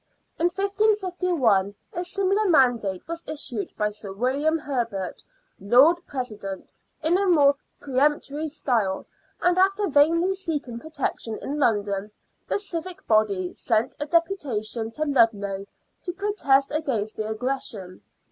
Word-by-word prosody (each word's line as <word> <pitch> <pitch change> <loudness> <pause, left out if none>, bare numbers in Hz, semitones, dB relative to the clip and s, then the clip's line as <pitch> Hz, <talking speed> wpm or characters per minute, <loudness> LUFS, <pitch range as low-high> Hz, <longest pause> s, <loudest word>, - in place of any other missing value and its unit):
In 330 - +2
1551 365 - +1 0.2
a 350 - -2
similar 395 +3 +1
mandate 240 - +2
was 335 0 -5
issued 285 -8 -4
by 210 0 0
Sir 205 -1 -7
William 270 +10 +1
Herbert, 235 - -3 0.4
Lord 250 - +6
President, 215 -8 -5 0.3
in 340 +4 +3
a 400 - +1
more 290 -5 +6 0.3
peremptory 290 +2 0
style, 235 -10 0 0.4
and 355 +1 +3
after 390 +2 +3
vainly 335 +5 +4
seeking 300 -11 -3
protection 275 -6 -3
in 290 +2 -4
London, 205 -5 +1 0.4
the - - +1
civic 370 -1 -5
body 200 -5 +2
sent 230 +1 0
a 295 - -3
deputation 265 - 0
to 300 +7 -3
Ludlow 205 -8 +1 0.3
to 355 - -4
protest 345 -9 +2
against 260 -9 -1
the 215 0 -3
aggression. 220 -6 -3
275 Hz, 125 wpm, -25 LUFS, 215-340 Hz, 0.4 s, Lord